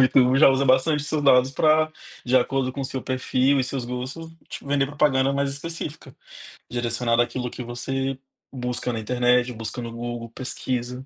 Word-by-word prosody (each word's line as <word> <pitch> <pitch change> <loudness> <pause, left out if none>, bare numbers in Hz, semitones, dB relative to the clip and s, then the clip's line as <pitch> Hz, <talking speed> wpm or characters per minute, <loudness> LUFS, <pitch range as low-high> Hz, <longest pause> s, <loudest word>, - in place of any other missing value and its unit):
o - - +8
YouTube 130 0 +4
já - - +8
usa 135 +1 +2
bastante 135 +3 +3
seus 150 0 -1
dados 130 -2 +5
pra 155 +3 +3 0.3
de 130 +1 +3
acordo 130 +1 +1
com 140 - -5
o - - -2
seu 130 0 -4
perfil 130 +1 +1
e - - 0
seus 130 -1 -3
gostos 130 +7 -5 0.2
te - - -7
vender 140 -1 +1
propaganda 140 -2 +2
mais 140 0 0
específica, 150 -1 -6 0.6
direcionada 120 0 +1
àquilo 125 0 -4
que 125 - -7
você 135 +3 -3 0.4
busca 125 -1 -2
na 110 - -3
internet, 125 +2 +2
busca 115 +2 -5
no 115 - -6
Google, 120 0 -5
pesquisa, 125 +1 -4
130 Hz, 180 wpm, -24 LUFS, 125-140 Hz, 0.6 s, o